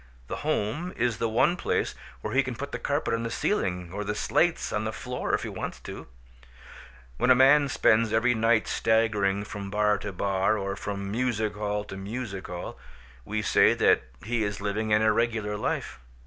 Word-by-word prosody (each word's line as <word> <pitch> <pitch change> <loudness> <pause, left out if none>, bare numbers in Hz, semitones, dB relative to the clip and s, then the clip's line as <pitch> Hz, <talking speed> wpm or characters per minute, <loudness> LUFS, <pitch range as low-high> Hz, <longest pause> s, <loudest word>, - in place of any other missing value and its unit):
The - - -3
home 140 - -2
is 120 -2 0
the 115 - 0
one 120 +10 +3
place - - -1 0.3
where - - -4
he 135 - +5
can 130 -2 -4
put 140 +5 -6
the - - -4
carpet 145 +2 -1
on 115 - 0
the 115 - -3
ceiling 90 - -1
or 105 - -3
the 105 +1 -2
slates 170 +9 +1
on 105 - 0
the 110 - -2
floor 125 +3 -2
if - - -4
he - - -4
wants - - -5
to. - - -8 1.1
When 125 - +1
a 130 - +8
man 135 +2 +6
spends 115 -3 +3
every 115 +2 +3
night 115 -1 +2
staggering 105 -3 +1
from 100 -1 -6
bar 105 0 +2
to 105 - -5
bar 95 +2 +1
or 100 -1 -3
from 100 -1 -4
music 110 -2 0
hall 105 0 -2
to 95 -2 -8
music 100 -1 -5
hall, 90 0 -7 0.5
we 105 +1 -2
say - - +4
that - - +4 0.2
he 115 0 0
is 100 -1 -3
living 105 +2 -2
an 105 +1 +4
irregular 110 -1 +1
life. - - -3
110 Hz, 190 wpm, -27 LUFS, 100-120 Hz, 1.1 s, a